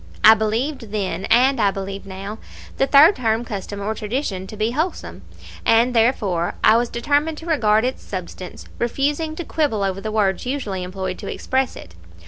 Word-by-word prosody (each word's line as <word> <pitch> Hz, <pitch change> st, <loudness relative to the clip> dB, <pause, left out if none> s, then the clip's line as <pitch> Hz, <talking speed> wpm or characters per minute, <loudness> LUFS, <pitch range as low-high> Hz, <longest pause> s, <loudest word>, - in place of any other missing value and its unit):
I 220 Hz, -, +10 dB
believed 225 Hz, +2 st, -2 dB
then 195 Hz, -2 st, -2 dB
(and 255 Hz, +2 st, +4 dB
I 200 Hz, -, +4 dB
believe 195 Hz, 0 st, -6 dB
now) 195 Hz, +3 st, -7 dB, 0.4 s
the 270 Hz, -, +2 dB
third 300 Hz, +8 st, +7 dB
term 225 Hz, -1 st, 0 dB
custom 205 Hz, -1 st, -6 dB
or 205 Hz, +2 st, -2 dB
tradition 210 Hz, -4 st, -3 dB
to 215 Hz, -, -9 dB
be 215 Hz, +2 st, 0 dB
wholesome, 315 Hz, +8 st, -3 dB, 0.4 s
and, 235 Hz, +2 st, +4 dB
therefore, 205 Hz, -7 st, +1 dB
I 220 Hz, -, +7 dB
was 235 Hz, +1 st, +1 dB
determined 290 Hz, +6 st, 0 dB
to 325 Hz, -, -9 dB
regard 225 Hz, -9 st, +2 dB
its 255 Hz, -, -3 dB
substance, 185 Hz, -1 st, -7 dB
refusing 290 Hz, +6 st, -1 dB
to 345 Hz, -, -5 dB
quibble 280 Hz, -10 st, 0 dB
over 195 Hz, 0 st, -2 dB
the 215 Hz, -, -4 dB
words 200 Hz, -4 st, +1 dB
usually 245 Hz, -8 st, -3 dB
employed 185 Hz, 0 st, -5 dB
to -, -, -5 dB
express 265 Hz, 0 st, -1 dB
it. 85 Hz, -, -12 dB
220 Hz, 175 wpm, -21 LUFS, 195-265 Hz, 0.4 s, I